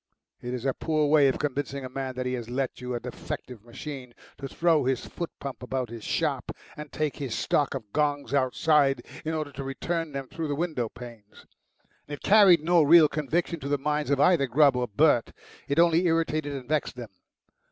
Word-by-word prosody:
It 125 +1 -4
is 125 +1 -6
a 135 - +1
poor 155 +1 0
way 145 -1 +5
of 135 - +1
convincing 140 -1 -3
a - - -6
man 130 0 -5
that 130 0 -3
he 125 - -1
has 120 -2 -5
let 130 0 -3
you 125 0 -4
a - - -2
defective 125 -2 -7
machine 125 +1 -9 0.2
to 140 - -5
throw 165 +2 +2
his 130 -1 -1
foot 170 - -5
pump 135 -6 -7
about 125 -1 -3
his 115 -2 -8
shop, - - -1 0.2
and 150 -1 -9
take 155 -2 -2
his 135 -5 -4
stock 145 -2 0
of 110 -6 -8
gongs 145 -2 0
outside 135 0 +2 0.2
in 160 +1 -2
order 155 -2 -3
to 140 0 -7
return 165 +4 -3
them 135 -1 -5
through 160 +2 -5
the 145 - -2
window 150 -8 -2
panes. 115 -3 -13 0.6
It 145 -1 -8
carried 195 -6 +6
no 170 +1 +4
real 155 +1 +7
conviction 155 +4 -2
to 140 - -6
the 145 - +1
minds 150 +1 -1
of 140 -1 +1
either 150 -3 +4
Grubb 140 +1 +4
or 125 0 -1
Bert; 120 +2 +2 0.3
it 140 - -1
only 170 +1 +4
irritated 160 -3 0
and 130 -3 -7
vexed 150 -2 -1
them. 120 -4 -8
140 Hz, 205 wpm, -27 LUFS, 125-155 Hz, 0.6 s, real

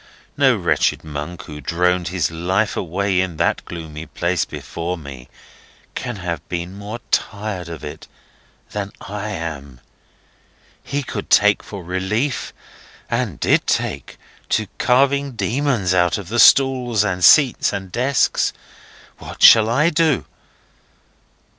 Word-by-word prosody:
No 135 -3 +4
wretched 85 -6 +1
monk 75 +3 -6
who 75 -1 -9
droned 90 +4 0
his 90 0 -1
life 95 +6 0
away 95 +2 -1
in 90 -4 -4
that - - 0
gloomy 80 -2 -8
place, 85 -1 -1
before 85 +2 -5
me, 70 -5 -10 0.6
can 120 -2 -4
have 85 -5 -4
been 85 +1 -4
more 105 +3 -6
tired 100 -5 -2
of 85 -2 -8
it 75 - -8 0.6
than 100 -1 -4
I 105 +2 -6
am. 75 -9 -6 1.0
He 145 0 -3
could 105 -5 -6
take 105 0 +4
for 100 -3 -9
relief 95 - -2 0.6
(and - - -2
did - - +2
take) - - -2 0.3
to 110 - +1
carving 135 +2 +2
demons 120 -6 0
out 90 -2 +2
of 100 -3 -8
the 120 +2 -1
stalls 125 -4 +5
and 90 -4 -2
seats 140 - +5
and 95 -2 -6
desks. 130 +6 +1 0.7
What - - -7
shall 110 -1 +8
I 150 +8 +3
do? 160 -3 +2
95 Hz, 130 wpm, -20 LUFS, 85-120 Hz, 1.0 s, shall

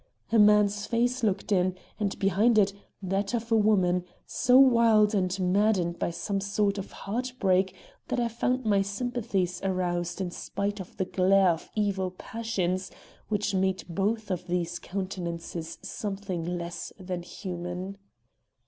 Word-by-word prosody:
A 230 - +5
man's 210 0 +4
face 245 +2 +1
looked 210 -2 0
in, 185 -1 +2 0.2
and 205 -2 -1
behind 205 +4 +3
it, 200 -2 +4 0.3
that 195 +3 -1
of 230 0 -4
a - - +5
woman, 190 -5 +3 0.2
so 250 +1 +3
wild 230 -5 +6
and 185 -1 0
maddened 185 -2 +2
by - - 0
some 195 +4 -2
sort 200 0 0
of 195 - -7
heart 250 +5 -4
break 190 0 +2 0.3
that - - -1
I 240 - +2
found 250 +2 -1
my 200 -2 +3
sympathies 200 -3 -2
aroused 175 -2 -1
in 185 -2 -2
spite 200 +3 -3
of 185 - -9
the 185 - 0
glare 190 +1 +4
of 165 - -5
evil 200 -3 0
passions 185 -3 -3 0.4
which 210 -1 0
made 190 0 +1
both 200 +4 -1
of 180 -1 -3
these 175 -1 -1
countenances 170 -3 -5
something 190 -4 -4
less 170 0 -5
than 180 -1 -4
human. 180 +2 -6
195 Hz, 150 wpm, -28 LUFS, 180-210 Hz, 0.4 s, wild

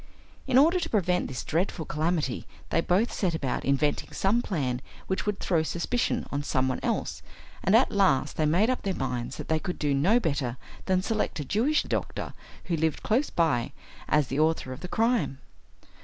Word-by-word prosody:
In 260 -1 +4
order 330 +7 +5
to 335 -1 -3
prevent 180 -4 +1
this 130 -3 -5
dreadful 165 0 -1
calamity 155 -3 -1 0.2
they 165 - +3
both 190 +7 +1
set 180 -5 0
about 135 -5 -2
inventing 140 +2 0
some 210 +5 +2
plan 130 - -2 0.2
which 190 +2 -2
would 205 -1 -1
throw 170 -4 +1
suspicion 175 +9 -1
on 145 - -1
some 130 -2 0
one 130 - -1
else, - - -2 0.4
and 190 - +4
at 245 - +5
last 190 -10 +2
they 155 - +1
made 190 +10 +3
up 255 - -2
their 195 -2 -2
minds 125 -2 -3
that - - -6
they 160 -1 +1
could 180 +2 -4
do 145 -2 0
no 180 - +4
better 140 - -1 0.3
than 185 -1 +2
select 215 -5 -1
a 145 - -3
Jewish 260 - +2
doctor - - -3 0.3
who 175 - -1
lived 160 -1 0
close 255 +7 +1
by 140 -6 +1 0.4
as 150 -3 +3
the 135 - -1
author 155 -4 +1
of 130 - -9
the 180 - -6
crime. 225 - +1
165 Hz, 190 wpm, -27 LUFS, 145-205 Hz, 0.4 s, order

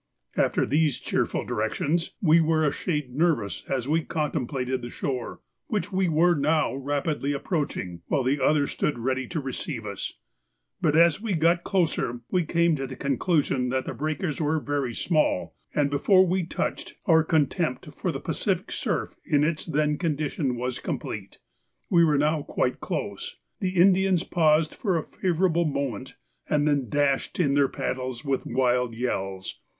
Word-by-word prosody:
After - - +2
these 150 -2 +1
cheerful - - -1
directions 145 +10 -1
we 165 -1 +6
were 160 -1 +2
a 145 - +3
shade 150 -6 -3
nervous 145 - 0
as 130 -2 -1
we 160 +3 +2
contemplated 130 -5 -2
the 120 - -6
shore, 125 -1 -4 0.3
which 205 -3 -2
we 190 -1 +1
were 165 +3 +4
now 155 -1 +1
rapidly 145 +1 -1
approaching, 140 - -3
while 140 -4 +1
the 135 +2 +1
others 145 -2 +3
stood 150 - -1
ready 130 +2 -1
to 170 - -3
receive 130 -3 -5
us, 100 -1 -5 0.7
but 150 - +2
as 170 +1 +5
we 215 -5 -1
got 170 +2 +3
closer 160 - 0
we 180 -1 +2
came 170 0 +2
to 135 -1 -3
the 130 - -7
conclusion 140 -2 +1
that 130 +1 -1
the - - -4
breakers 155 +4 -2
were 155 +1 +1
very 140 -5 -2
small, 155 - +1 0.2
and 145 -1 +2
before 185 +7 +5
we 180 -1 0
touched - - -3
our 160 -2 +5
contempt 155 -2 0
for - - -1
the - - -4
Pacific - - -2
surf - - -2
in 145 0 +2
its 155 +2 -1
then 150 -1 +1
condition 150 -5 -1
was 125 +1 -3
complete. - - -5 0.5
We 170 -2 +6
were 150 -3 +3
now 150 +2 +2
quite - - -1
close; - - -4 0.2
the 185 -2 -2
Indians 185 0 +4
paused 155 -3 +2
for 190 -6 0
a 160 - -2
favourable 170 -1 +1
moment, 140 -4 -3 0.3
and 150 0 +2
then 140 -5 +1
dashed 145 - 0
in 145 -6 +3
their 140 -1 +4
paddles 130 0 -4
with 135 -2 -1
wild 125 -2 +1
yells. 95 -6 -3
150 Hz, 165 wpm, -26 LUFS, 130-165 Hz, 0.7 s, we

